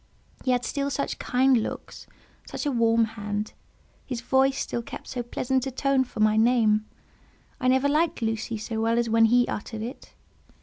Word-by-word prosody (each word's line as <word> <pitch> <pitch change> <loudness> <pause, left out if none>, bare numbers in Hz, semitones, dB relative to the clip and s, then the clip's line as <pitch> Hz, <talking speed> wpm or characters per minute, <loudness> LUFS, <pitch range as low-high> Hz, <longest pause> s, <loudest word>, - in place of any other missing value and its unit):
He - - -2
had 250 -1 +2
still 280 -1 -2
such 280 0 -3
kind 260 +1 +3
looks, 225 - -4 0.4
such - - -5
a 290 - +1
warm 230 -2 +3
hand; 210 -1 -4 0.5
his 250 -3 -4
voice 265 +2 +2
still 235 - -2
kept - - -9
so 250 - -3
pleasant 255 +2 -1
a - - -1
tone 265 0 +1
for 245 - -10
my 215 0 +4
name; 220 -2 +3 0.7
I 255 - 0
never 260 +2 +3
liked 300 -3 +1
"Lucy" 225 0 -2
so 220 +1 -4
well 230 +1 +1
as 235 -1 0
when 225 0 +5
he 245 +2 +4
uttered 215 +1 -5
it. 245 +5 -9
240 Hz, 180 wpm, -26 LUFS, 225-265 Hz, 0.7 s, when